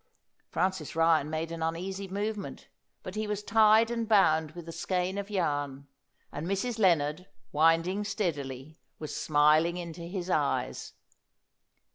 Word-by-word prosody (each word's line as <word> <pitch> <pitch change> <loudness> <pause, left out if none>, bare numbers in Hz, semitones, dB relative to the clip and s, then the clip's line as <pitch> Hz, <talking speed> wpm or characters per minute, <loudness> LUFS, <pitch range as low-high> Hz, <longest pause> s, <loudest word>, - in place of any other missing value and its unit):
Francis 180 -3 -1
Ryan 165 -2 +3
made 160 +1 -3
an 165 -1 -6
uneasy 185 +4 -3
movement, 205 +1 -4 0.3
but 185 - -7
he 215 +1 -3
was 210 0 -3
tied 220 +2 +5
and 230 -1 -2
bound 160 -7 +4
with 175 -1 -9
the 165 - -7
skein 185 +3 -2
of 200 0 -6
yarn; 145 -8 -2 0.5
and 150 +4 -5
Mrs. 220 +5 -2
Lennard, 170 -2 +2 0.2
winding 165 +6 +3
steadily, 150 - -4 0.2
was 155 - -6
smiling 155 +3 +3
into 170 -1 -7
his 175 +1 -5
eyes. 150 -6 -1
175 Hz, 135 wpm, -29 LUFS, 155-200 Hz, 0.5 s, tied